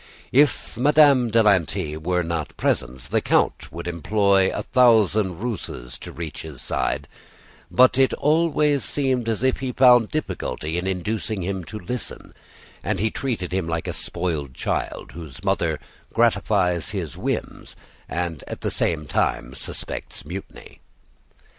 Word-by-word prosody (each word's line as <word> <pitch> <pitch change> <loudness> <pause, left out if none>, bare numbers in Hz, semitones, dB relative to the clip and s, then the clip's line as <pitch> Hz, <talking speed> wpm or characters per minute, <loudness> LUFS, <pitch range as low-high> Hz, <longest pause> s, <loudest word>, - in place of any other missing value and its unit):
If 135 -3 +3
Madame 140 -3 +5
de 115 0 +4
Lanty 85 -6 +2
were 90 +3 0
not 80 -3 -4
present, 65 +1 -1
the - - +2
Count - - +1
would 85 +1 -6
employ 95 +3 +2
a - - -3
thousand 110 -7 +4
ruses 65 - -5
to - - -8
reach 80 -2 -6
his 75 -5 -9
side; - - -2 0.6
but 125 +7 +5
it 135 - +5
always 150 -2 +2
seemed 130 -5 0
as 115 +1 -1
if 130 -1 +2
he 130 -1 -2
found 125 -3 +6
difficulty 85 - -3
in 90 - -3
inducing 100 +2 -2
him 95 0 -3
to 110 - -7
listen, 120 +6 -5 0.5
and - - -1
he 110 +2 +1
treated 110 -10 -3
him 95 -3 0
like 80 0 -2
a - - -2
spoiled 75 -7 -3
child, - - -3
whose 80 -6 -10
mother - - 0 0.3
gratifies 90 -2 +2
his 90 -9 -4
whims - - -4 0.3
and 85 -4 -3
at - - -6
the - - -1
same 80 -3 0
time 65 -2 -1
suspects - - -6
mutiny. 90 +5 -9
95 Hz, 145 wpm, -23 LUFS, 80-125 Hz, 0.6 s, found